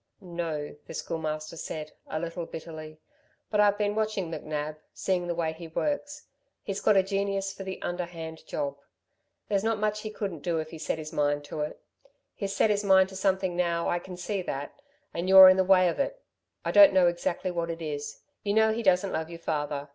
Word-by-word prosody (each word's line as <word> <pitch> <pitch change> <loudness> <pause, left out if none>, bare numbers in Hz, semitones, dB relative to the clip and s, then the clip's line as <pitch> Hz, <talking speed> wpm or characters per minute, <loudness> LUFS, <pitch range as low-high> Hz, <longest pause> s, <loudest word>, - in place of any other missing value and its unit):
"No," 170 -6 -4
the - - -7
Schoolmaster 155 -1 -4
said, 155 -1 -6 0.2
a 155 - -3
little 170 +1 -4
bitterly. 155 -1 -8 0.5
"But 210 - +1
I've 205 -1 +5
been 205 -1 +1
watching 215 -5 -1
McNab 155 -1 -4 0.2
seeing 180 -2 0
the 170 - -1
way 165 -2 -1
he 165 +1 -9
works. 290 - -2 0.4
He's 195 -1 -4
got 210 - +4
a 190 - +5
genius 195 0 -1
for - - -10
the 190 0 -5
underhand 170 -2 -5
job. 140 -1 -3 0.7
There's 200 -1 +1
not 225 0 +1
much 210 0 0
he 215 - -5
couldn't 200 -6 -4
do 170 0 -1
if 155 0 -4
he 160 - -8
set 155 - -2
his 155 0 -7
mind 145 -1 +1
to 145 +1 -7
it. 150 0 -3 0.5
He's 200 -1 -4
set 215 - +4
his 205 0 +1
mind 190 -1 +5
to 190 - -10
something 190 -2 +1
now 170 -1 0
I 175 - +1
can 180 0 -9
see 195 +2 -2
that... 140 -5 -5 0.3
and 175 +2 -2
you're 190 0 +11
in 185 - +5
the 190 - +4
way 185 -1 +5
of 170 - -1
it. - - -1 0.5
I - - +1
don't 300 -6 +8
know 185 -1 +5
exactly 175 +1 0
what 170 -1 -2
it 165 0 -4
is. 145 -2 -5 0.2
You 205 0 -1
know 220 0 +5
he 230 - -2
doesn't 190 -2 +3
love 160 0 -2
your 170 - -7
father. 145 -3 -2
175 Hz, 210 wpm, -28 LUFS, 160-195 Hz, 0.7 s, you're